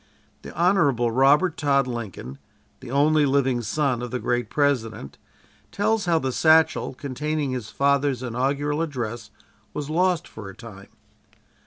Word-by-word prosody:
The - - -9
Hon. 180 +3 +4 0.3
Robert 145 +8 +3
Todd 140 -2 +2
Lincoln, 105 - -7 0.4
the - - -11
only 150 +3 +3
living 135 -3 +1
son 125 +2 -1
of 125 - -5
the 125 - -3
great 120 0 -2
President, 125 - -1 0.5
tells 215 +1 0
how 170 -2 +2
the 130 -4 -1
satchel 160 -1 +3
containing 145 +2 -3
his 125 -4 -5
father's 140 -2 +1
inaugural 140 +5 -1
address 120 -7 -4 0.5
was 150 0 -4
lost 180 0 +1
for 105 -3 -10
a 95 - -11
time. 105 -4 -12
140 Hz, 140 wpm, -24 LUFS, 120-150 Hz, 0.5 s, Hon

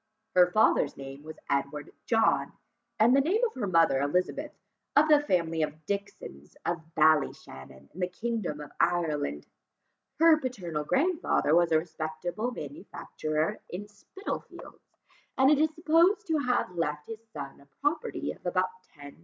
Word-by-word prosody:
Her 180 -1 +6
father's 180 -7 +3
name 135 +1 -9
was 155 +1 -10
Edward 140 +1 -2 0.2
John, 225 -1 +2 0.5
and 235 +4 +6
the 275 - +5
name 370 - +1
of 455 - -3
her 230 -6 -3
mother 165 -7 +3
Elizabeth, 180 +6 -1 0.4
of 300 +2 +6
the 300 -1 +6
family 170 - 0
of 155 0 -3
Dixons 195 - -6
of 170 -1 -1
Ballyshannon 70 - 0
in 185 - -12
the 180 - +1
kingdom 185 -5 -3
of 145 - -10
Ireland: 150 - 0 0.7
her 330 0 +6
paternal 180 - -4
grandfather 310 - +1
was 170 0 +4
a 160 - +5
respectable 160 +6 -3
manufacturer 160 - -4
in 200 +4 -6
Spitalfields, 205 - -8 0.6
and 265 +2 +5
is 305 +1 +4
supposed 340 +6 +3
to 315 -2 +2
have 250 -8 0
left 150 -3 -2
to - - -9
his 225 +1 -30
son 140 -2 -8
a 140 - -20
property 320 +12 -1
of - - -13
about 185 +1 0 0.3
10,000l. 145 - -12
175 Hz, 150 wpm, -28 LUFS, -, 0.7 s, Her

